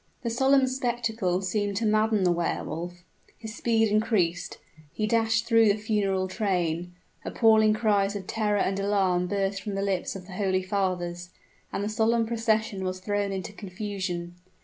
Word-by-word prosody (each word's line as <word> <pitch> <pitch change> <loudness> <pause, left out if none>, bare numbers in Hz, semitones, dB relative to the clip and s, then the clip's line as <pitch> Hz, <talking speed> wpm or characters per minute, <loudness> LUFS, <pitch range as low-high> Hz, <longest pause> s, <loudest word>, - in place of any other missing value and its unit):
The 235 - -1
solemn 265 +3 +4
spectacle 230 -7 -1
seemed 200 +1 -1
to 225 - 0
madden 215 -1 +2
the 180 - +3
Wehr 170 -1 -1
Wolf. 175 +3 -6 0.3
His 220 -2 -8
speed 225 -2 +1
increased 190 -6 0 0.3
he 215 - -2
dashed 225 +1 +2
through 230 -1 +5
the 200 - +4
funeral 200 -3 0
train 180 -4 -1 0.3
appalling 220 -2 +4
cries 205 -3 +1
of 195 -2 -5
terror 210 0 0
and 195 0 0
alarm 190 -3 +1
burst 195 0 -1
from 205 -1 -4
the 195 - -1
lips 195 -2 -1
of 185 -2 -8
the 185 - -11
holy 185 -1 0
fathers 180 -3 -2 0.4
and 200 - -2
the - - -1
solemn 225 +2 +2
procession 220 -3 0
was 185 0 -3
thrown 205 +1 -1
into 190 +1 -5
confusion. 185 -3 -5
200 Hz, 165 wpm, -27 LUFS, 185-220 Hz, 0.4 s, through